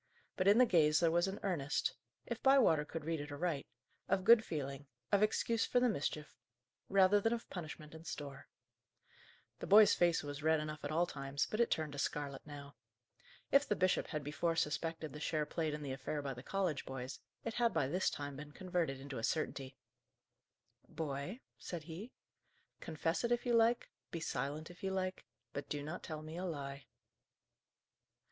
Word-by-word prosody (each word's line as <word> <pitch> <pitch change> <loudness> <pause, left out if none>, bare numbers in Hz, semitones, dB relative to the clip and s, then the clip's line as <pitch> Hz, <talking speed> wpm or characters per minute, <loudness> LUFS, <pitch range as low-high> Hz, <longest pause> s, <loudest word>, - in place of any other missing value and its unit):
But 185 - +1
in 205 +2 +7
the 255 - +8
gaze 155 -7 +4
there 165 -2 +3
was 175 +2 +3
an 195 +1 -4
earnest 160 -7 0 0.3
if - - -4
Bywater 255 - +5
could 160 0 -6
read 165 -2 -1
it 145 0 -7
aright 150 -1 -2 0.4
of 195 -1 +2
good 225 +2 +8
feeling, 140 -5 -4 0.2
of 200 - +4
excuse 225 +2 +2
for 250 - +3
the 250 - +4
mischief, 150 - -3 0.5
rather 195 +1 +5
than 225 +3 +2
of 235 - -4
punishment 155 -3 -7
in 160 0 -10
store. 140 -4 -7 1.1
The - - -5
boy's 210 +1 +8
face 175 -1 +3
was 145 0 -5
red 160 +1 +3
enough 155 0 -5
at 145 - -3
all 170 +3 +3
times, 140 -3 -2
but 215 - -4
it 235 - +4
turned 155 -2 -1
to 145 - -5
scarlet 140 -1 -2
now. 145 -1 -9 0.8
If 280 +1 +5
the 210 - +2
bishop 185 0 +2
had 150 -2 -3
before 155 +3 0
suspected 160 -1 -1
the 150 - -7
share 155 0 0
played 155 0 -1
in 150 - -6
the 140 - -4
affair 145 +2 -3
by 135 -1 -2
the 125 - -9
college 180 -2 -1
boys, 130 0 -6 0.2
it 230 - -3
had 235 -1 +2
by 160 -5 +1
this 180 +8 +1
time 145 -1 -5
been 150 0 -9
converted 175 -7 -1
into 135 -2 -6
a - - -6
certainty. 135 -3 -1 1.1
"Boy," 150 - -4 0.2
said 170 -3 -5
he, 175 +10 -8 0.7
"confess 165 +5 -1
it 235 - 0
if 240 +1 +1
you 240 - +2
like, 230 +1 +3 0.2
be 170 - -4
silent 150 +2 -3
if 175 - -16
you 195 - -1
like; 185 -1 -2 0.3
but 145 - -5
do 145 -1 -2
not 155 +4 -5
tell 155 -2 -6
me 155 +2 -7
a 185 - -3
lie." 140 -4 -5
160 Hz, 190 wpm, -36 LUFS, 145-190 Hz, 1.1 s, the